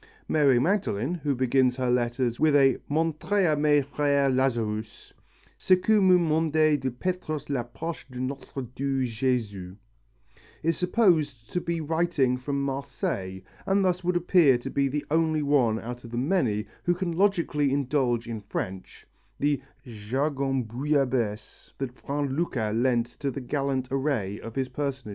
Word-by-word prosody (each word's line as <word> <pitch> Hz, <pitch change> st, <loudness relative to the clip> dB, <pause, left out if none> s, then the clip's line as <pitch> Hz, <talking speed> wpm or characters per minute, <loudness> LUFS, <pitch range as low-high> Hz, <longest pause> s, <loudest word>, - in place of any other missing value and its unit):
Mary 140 Hz, -5 st, +4 dB
Magdalen, 160 Hz, -, 0 dB
who 150 Hz, -5 st, -1 dB
begins 130 Hz, 0 st, +2 dB
her 125 Hz, -1 st, 0 dB
letter 120 Hz, +1 st, +1 dB
with 155 Hz, -2 st, +4 dB
a 135 Hz, -2 st, +4 dB
mon 160 Hz, +2 st, +1 dB
très 195 Hz, +5 st, 0 dB
aimé 145 Hz, -1 st, +3 dB
frère 140 Hz, -1 st, +1 dB
Lazarus, 115 Hz, -5 st, -2 dB, 0.5 s
ce 185 Hz, -, +5 dB
que 210 Hz, +3 st, +2 dB
me 185 Hz, -1 st, +6 dB
mandez 155 Hz, -2 st, +2 dB
de 130 Hz, -, -1 dB
Petrus 155 Hz, +1 st, -4 dB
l'apostre 135 Hz, +4 st, -4 dB
de 125 Hz, -1 st, -8 dB
notre 135 Hz, +1 st, -5 dB
doux 135 Hz, +2 st, -2 dB
Jesus, 110 Hz, -6 st, -2 dB, 0.9 s
is 165 Hz, +1 st, +2 dB
supposed 165 Hz, -, +1 dB
to 180 Hz, -, -1 dB
be 170 Hz, -1 st, -2 dB
writing 155 Hz, -5 st, +1 dB
from 140 Hz, +2 st, -3 dB
Marseilles 100 Hz, -9 st, -3 dB, 0.2 s
and 195 Hz, 0 st, +3 dB
thus 180 Hz, 0 st, 0 dB
would 180 Hz, +1 st, 0 dB
appear 170 Hz, -6 st, +4 dB
to 120 Hz, -, -7 dB
be 140 Hz, 0 st, +1 dB
the 145 Hz, +2 st, -3 dB
only 160 Hz, -1 st, +2 dB
one 130 Hz, -6 st, +2 dB
out 120 Hz, +1 st, -7 dB
of 120 Hz, -, -9 dB
the 120 Hz, -, -5 dB
many 125 Hz, -, +1 dB, 0.2 s
who 175 Hz, -, +2 dB
can 180 Hz, -1 st, -2 dB
logically 170 Hz, -6 st, +1 dB
indulge 130 Hz, -4 st, 0 dB
in 115 Hz, -2 st, -5 dB
French, 95 Hz, -2 st, -6 dB, 0.3 s
the 145 Hz, -1 st, +1 dB, 0.2 s
jargon 135 Hz, +4 st, -1 dB
bouillabaisse 125 Hz, -3 st, -2 dB
that 135 Hz, -2 st, -3 dB
Vrain 140 Hz, -1 st, -3 dB
Lucas 120 Hz, -10 st, -1 dB
lent 120 Hz, 0 st, +2 dB
to 130 Hz, +4 st, -5 dB
the 135 Hz, -, -5 dB
gallant 135 Hz, -1 st, -2 dB
array 130 Hz, -8 st, -1 dB
of 115 Hz, 0 st, -9 dB
his 135 Hz, -1 st, -1 dB
personages. 135 Hz, -3 st, -4 dB
135 Hz, 155 wpm, -26 LUFS, 125-155 Hz, 0.9 s, me